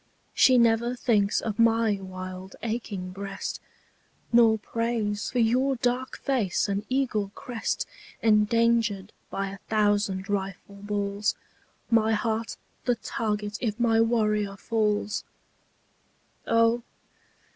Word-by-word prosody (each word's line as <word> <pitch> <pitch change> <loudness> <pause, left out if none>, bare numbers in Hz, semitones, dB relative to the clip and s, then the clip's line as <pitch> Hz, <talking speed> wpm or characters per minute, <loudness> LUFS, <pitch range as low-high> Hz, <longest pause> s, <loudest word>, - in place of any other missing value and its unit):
She 255 -1 +6
never 235 +1 +3
thinks 210 -5 +2
of 215 -2 -4
my 225 -3 +3
wild 185 0 -7
aching 215 -5 -3
breast, 195 +1 -5 0.7
Nor 230 -2 +6
prays 220 -2 -2
for 250 - -4
your 250 +4 +3
dark 250 +1 -1
face 230 -11 0
and 200 0 -1
eagle 240 -7 0
crest 240 -3 -3 0.3
Endangered 220 -2 +2 0.2
by 195 0 -2
a 200 - -9
thousand 205 -3 +1
rifle 195 -1 -3
balls, 205 0 -1 0.6
My 225 -1 +4
heart 225 +1 -1 0.3
the 245 - +2
target 210 -2 -3
if 225 -1 -2
my 225 -1 +4
warrior 215 -3 +1
falls. 210 -2 0 1.2
O! 230 +1 +3
215 Hz, 110 wpm, -27 LUFS, 200-230 Hz, 1.2 s, She